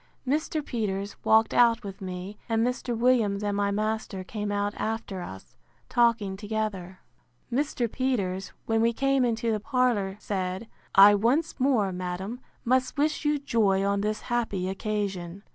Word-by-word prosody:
Mr. 305 Hz, +2 st, 0 dB
Peters 200 Hz, -4 st, -3 dB
walked 220 Hz, 0 st, +4 dB
out 235 Hz, -1 st, +4 dB
with 195 Hz, -1 st, -8 dB
me; 185 Hz, +2 st, -6 dB
and 225 Hz, 0 st, +2 dB
Mr. 245 Hz, -1 st, -2 dB
Williams 225 Hz, -4 st, +2 dB
and 205 Hz, -1 st, 0 dB
my 200 Hz, 0 st, +1 dB
master 215 Hz, -2 st, -2 dB
came 205 Hz, +1 st, -4 dB
out 205 Hz, 0 st, 0 dB
after 220 Hz, -4 st, -3 dB
us, 95 Hz, -, -10 dB, 0.3 s
talking 230 Hz, -5 st, +2 dB
together. 200 Hz, -3 st, -4 dB, 0.5 s
Mr. 260 Hz, -2 st, 0 dB
Peters, 200 Hz, -8 st, -1 dB
when 225 Hz, 0 st, +1 dB
we 230 Hz, +1 st, +3 dB
came 275 Hz, +1 st, +2 dB
into 230 Hz, -1 st, 0 dB
the 215 Hz, -, 0 dB
parlour, 230 Hz, -6 st, 0 dB
said, 190 Hz, +1 st, -3 dB, 0.3 s
I 200 Hz, +1 st, +9 dB
once 255 Hz, +11 st, +1 dB
more, 250 Hz, -7 st, +2 dB
madam, 185 Hz, +5 st, -4 dB, 0.3 s
must 255 Hz, +3 st, +1 dB
wish 305 Hz, +2 st, 0 dB
you 295 Hz, 0 st, +3 dB
joy 210 Hz, -8 st, +2 dB
on 200 Hz, 0 st, +1 dB
this 215 Hz, +1 st, -1 dB
happy 225 Hz, -6 st, -1 dB
occasion. 195 Hz, -2 st, -3 dB
215 Hz, 150 wpm, -27 LUFS, 195-240 Hz, 0.5 s, I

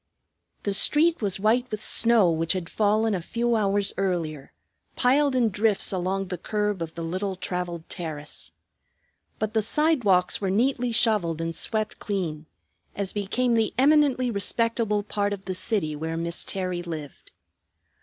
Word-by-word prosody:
The 200 Hz, -, -1 dB
street 320 Hz, -, +3 dB
was 195 Hz, -3 st, 0 dB
white 235 Hz, +5 st, +1 dB
with 215 Hz, -, -4 dB
snow 230 Hz, -6 st, +5 dB
which 165 Hz, 0 st, 0 dB
had 180 Hz, -3 st, -5 dB
fallen 215 Hz, +1 st, +1 dB
a 185 Hz, -, -2 dB
few 235 Hz, +6 st, -1 dB
hours 200 Hz, -2 st, +1 dB
earlier, 165 Hz, -7 st, -2 dB, 0.4 s
piled 275 Hz, +2 st, +2 dB
in 240 Hz, -3 st, +3 dB
drifts 210 Hz, 0 st, +2 dB
along 190 Hz, +1 st, -2 dB
the 180 Hz, -2 st, -4 dB
curb 210 Hz, -1 st, -2 dB
of 165 Hz, -1 st, -5 dB
the 170 Hz, -, -5 dB
little 185 Hz, +4 st, -3 dB
traveled 180 Hz, -2 st, -4 dB
terrace. 155 Hz, -4 st, -3 dB, 0.9 s
But 215 Hz, 0 st, -3 dB
the 220 Hz, -, +2 dB
sidewalks 215 Hz, -, +3 dB
were 195 Hz, -, -1 dB
neatly 245 Hz, +4 st, +1 dB
shoveled 210 Hz, -8 st, +2 dB
and 165 Hz, 0 st, -3 dB
swept 215 Hz, +3 st, -1 dB
clean, 165 Hz, -7 st, -4 dB, 0.5 s
as 200 Hz, -2 st, -2 dB
became 230 Hz, +5 st, 0 dB
the 225 Hz, -2 st, +1 dB
eminently 270 Hz, -3 st, +3 dB
respectable 220 Hz, 0 st, 0 dB
part 205 Hz, 0 st, -2 dB
of 195 Hz, -1 st, -8 dB
the 185 Hz, -, -3 dB
city 180 Hz, -5 st, -1 dB
where 160 Hz, +2 st, -4 dB
Miss 170 Hz, +1 st, -3 dB
Terry 185 Hz, -2 st, -2 dB
lived. 160 Hz, -4 st, -8 dB
200 Hz, 155 wpm, -25 LUFS, 175-230 Hz, 0.9 s, snow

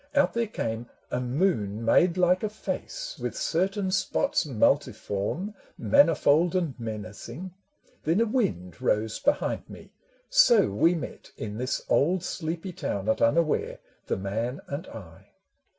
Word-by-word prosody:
Out 285 Hz, -, +4 dB
there 235 Hz, -1 st, 0 dB
came 115 Hz, -, -4 dB, 0.2 s
A 125 Hz, -, 0 dB
moon 120 Hz, -, 0 dB
made 170 Hz, +9 st, +4 dB
like 180 Hz, 0 st, +3 dB
a 215 Hz, -, -1 dB
face -, -, -5 dB
with -, -, -4 dB
certain 190 Hz, +3 st, 0 dB
spots 195 Hz, -, +1 dB
Multiform, 120 Hz, -, 0 dB, 0.2 s
manifold 150 Hz, -, +4 dB
and 170 Hz, -6 st, 0 dB
menacing: 115 Hz, -, -7 dB, 0.5 s
Then 165 Hz, +6 st, +2 dB
a 230 Hz, -, +4 dB
wind 90 Hz, -, -1 dB
rose 105 Hz, +1 st, 0 dB
behind 285 Hz, -, 0 dB
me. -, -, -12 dB, 0.4 s
So 240 Hz, -, +5 dB
we 165 Hz, -, +3 dB
met 165 Hz, -, -7 dB
In 105 Hz, +1 st, -5 dB
this 130 Hz, +1 st, -2 dB
old 175 Hz, +5 st, +2 dB
sleepy 170 Hz, +1 st, -4 dB
town 100 Hz, -9 st, -3 dB
at 110 Hz, -, +1 dB
unaware, 155 Hz, +2 st, +2 dB, 0.3 s
The -, -, 0 dB
man 110 Hz, +7 st, -3 dB
and 145 Hz, +6 st, -5 dB
I. 85 Hz, -7 st, -12 dB
160 Hz, 135 wpm, -27 LUFS, 110-185 Hz, 0.5 s, So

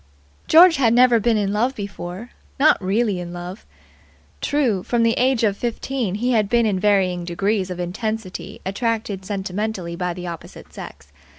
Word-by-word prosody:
George 335 Hz, +1 st, +7 dB
had 235 Hz, -4 st, +3 dB
never 245 Hz, -1 st, +5 dB
been 225 Hz, +1 st, +2 dB
in 200 Hz, -1 st, 0 dB
love 245 Hz, +6 st, 0 dB
before. 200 Hz, +2 st, -7 dB, 0.3 s
Not 300 Hz, -7 st, +4 dB
really 200 Hz, 0 st, +1 dB
in 175 Hz, 0 st, -6 dB
love. 175 Hz, +3 st, -8 dB, 0.7 s
True, 255 Hz, -10 st, +1 dB
from 235 Hz, +4 st, 0 dB
the 230 Hz, 0 st, +3 dB
age 255 Hz, -1 st, +1 dB
of 205 Hz, -3 st, +2 dB
fifteen, 240 Hz, -2 st, -3 dB
he 245 Hz, +4 st, 0 dB
had 215 Hz, -4 st, +2 dB
been 235 Hz, 0 st, +3 dB
in 200 Hz, -4 st, 0 dB
varying 190 Hz, -3 st, +2 dB
degrees 190 Hz, +3 st, -1 dB
of 180 Hz, -1 st, -5 dB
intensity 215 Hz, +2 st, -4 dB
attracted 200 Hz, -1 st, -2 dB
sentimentally 190 Hz, -2 st, -3 dB
by 180 Hz, 0 st, -3 dB
the 180 Hz, 0 st, -7 dB
opposite 170 Hz, -2 st, -9 dB
sex. 70 Hz, 0 st, -11 dB
205 Hz, 165 wpm, -21 LUFS, 185-235 Hz, 0.7 s, George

